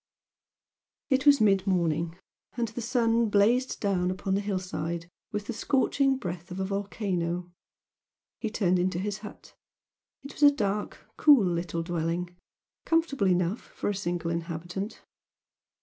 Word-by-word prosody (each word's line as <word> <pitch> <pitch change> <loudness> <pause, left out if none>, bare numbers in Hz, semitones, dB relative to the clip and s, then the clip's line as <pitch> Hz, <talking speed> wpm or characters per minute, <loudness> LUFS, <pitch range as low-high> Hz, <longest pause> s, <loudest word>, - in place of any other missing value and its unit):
It 265 +2 +2
was 285 -1 +8
mid 195 -2 +3
morning, 170 -2 0 0.4
and 235 -2 0
the 225 +3 -6
sun 235 -1 +2
blazed 230 +6 +3
down 185 -3 +1
upon 190 +1 -2
the 200 - +1
hill 200 -2 -1
side 170 -2 -4 0.2
with 210 -1 -3
the 240 - -4
scorching 270 +3 +2
breath 175 -6 -6
of 180 +1 -6
a 190 - 0
volcano. 180 -3 -2 0.9
He 220 - -2
turned 185 -5 +1
into 180 -1 0
his 205 +2 -3
hut, 210 - -11 0.7
it 280 - -9
was - - -12
a 290 - +9
dark, 210 -7 -2
cool 285 -9 +6
little 170 -1 -1
dwelling, 175 +1 -2 0.5
comfortable 325 -10 +1
enough 180 +3 +1
for - - -4
a - - -3
single 175 -3 -2
inhabitant. 170 +4 -4
195 Hz, 145 wpm, -28 LUFS, 175-225 Hz, 0.9 s, a